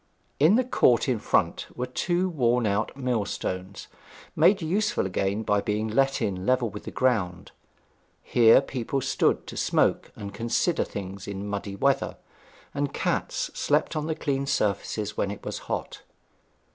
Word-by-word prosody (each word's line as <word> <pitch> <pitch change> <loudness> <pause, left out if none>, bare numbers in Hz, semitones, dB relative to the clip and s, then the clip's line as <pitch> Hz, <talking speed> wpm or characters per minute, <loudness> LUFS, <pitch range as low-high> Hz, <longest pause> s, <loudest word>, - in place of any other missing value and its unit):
In 160 +8 +6
the 255 - +3
court 130 - +3
in 125 -4 +1
front - - 0
were 125 - -2
two 175 +8 0
worn 125 -8 +1
out 105 +5 -1
millstones, 100 -6 -3 0.5
made 195 +1 +5
useful 195 - 0
again 95 +3 -1
by 105 -1 +1
being 105 +1 -1
let 135 +5 +1
in 95 -2 -2
level 125 0 +1
with 105 - -9
the - - -4
ground. 105 -9 0 0.7
Here 115 +1 +6
people 135 0 -3
stood - - +1
to - - -9
smoke - - +1
and 100 -1 -7
consider 120 - 0
things 100 0 -7
in 100 0 -5
muddy 100 -1 -4
weather; 135 +6 +1 0.6
and 140 0 -1
cats - - -1
slept - - +1
on 155 0 -2
the 160 - -1
clean 140 -2 -2
surfaces 105 -2 -1
when 100 - 0
it 100 - -7
was - - -4
hot. - - -4
120 Hz, 155 wpm, -26 LUFS, 100-140 Hz, 0.7 s, In